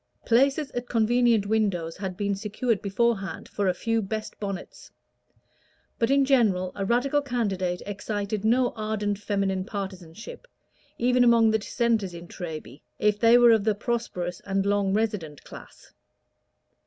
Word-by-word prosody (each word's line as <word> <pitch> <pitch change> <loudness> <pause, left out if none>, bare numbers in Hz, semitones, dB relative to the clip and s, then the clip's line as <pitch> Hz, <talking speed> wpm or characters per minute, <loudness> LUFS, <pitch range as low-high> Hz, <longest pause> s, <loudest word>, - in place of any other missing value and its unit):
Places 275 +4 +2
at 245 0 -5
convenient 230 -1 +3
windows 200 -6 0
had 190 -2 -5
been 200 -1 0
secured 215 +2 -1
beforehand 200 -1 -1
for 200 -1 -2
a 185 - +3
few 225 +3 0
best 215 +2 -5
bonnets; 195 -2 -6 1.1
but, 230 - +2
in 275 0 +4
general, 210 -9 +2
a 200 - -4
Radical 250 +7 +1
candidate 195 -9 -2
excited 205 0 -3
no 245 +3 +3
ardent 215 -2 -2
feminine 195 -2 -1
partisanship, 195 - -7 0.5
even 250 +1 +3
among 230 -2 +5
the 220 - +2
Dissenters 215 -4 -1
in 170 0 -9
Treby, 155 -5 -8 0.2
if 210 -1 +1
they 230 +2 +6
were 240 -1 +7
of 220 -3 +3
the 215 -1 +1
prosperous 205 -6 -3
and 195 0 -1
long 200 -1 +1
resident 205 -9 -2
class. - - -13
210 Hz, 140 wpm, -26 LUFS, 195-235 Hz, 1.1 s, were